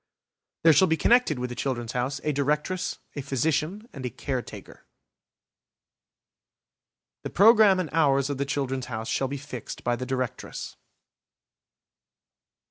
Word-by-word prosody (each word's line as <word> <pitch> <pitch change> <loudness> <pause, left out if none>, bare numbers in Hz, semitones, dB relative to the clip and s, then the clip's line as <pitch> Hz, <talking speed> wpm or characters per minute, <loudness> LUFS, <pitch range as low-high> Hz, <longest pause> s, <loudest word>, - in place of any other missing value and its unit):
There 165 -1 +7
shall 185 +6 +5
be 160 - +1
connected 235 - +3
with 125 0 -4
the - - -5
"Children's 120 -3 -3
House" 130 +3 -2
a 150 - +1
Directress, 150 +6 -1 0.2
a 145 - -3
Physician, 155 - -1
and 135 - -8
a 125 - -2
Caretaker. 130 +1 -6 2.3
The - - -5
programme 210 -1 +6
and 175 -4 -3
hours 140 -4 +3
of 140 -2 -4
the 140 - 0
"Children's 135 -3 -2
House" 110 -2 -5
shall 135 +4 0
be 140 +2 -4
fixed 130 -4 -8
by 120 0 +1
the 125 +2 -5
Directress. 130 -2 -4
140 Hz, 135 wpm, -26 LUFS, 130-160 Hz, 2.3 s, There